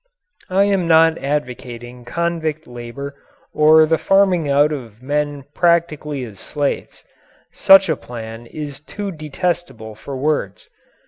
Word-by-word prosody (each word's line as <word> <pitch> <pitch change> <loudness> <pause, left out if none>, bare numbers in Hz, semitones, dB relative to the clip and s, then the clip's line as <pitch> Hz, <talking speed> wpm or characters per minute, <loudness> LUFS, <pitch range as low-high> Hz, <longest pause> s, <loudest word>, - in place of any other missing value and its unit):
I 190 +2 +3
am 195 -4 +1
not 165 0 +5
advocating 125 -3 -5
convict 160 +1 -2
labour 120 +4 -8 0.4
or 155 +1 +6
the 160 +1 +1
farming 190 -6 +3
out 145 +2 +4
of 120 -5 -7
men 145 0 -2
practically 155 -5 +1
as 105 -5 -10
slaves. 145 +5 -3 0.5
Such 195 0 +6
a 160 - +1
plan 115 -2 -9
is 145 0 -7
too 200 +6 -6
detestable 155 -7 -4
for 135 +5 -8
words. 135 -9 -2
150 Hz, 125 wpm, -19 LUFS, 125-165 Hz, 0.5 s, or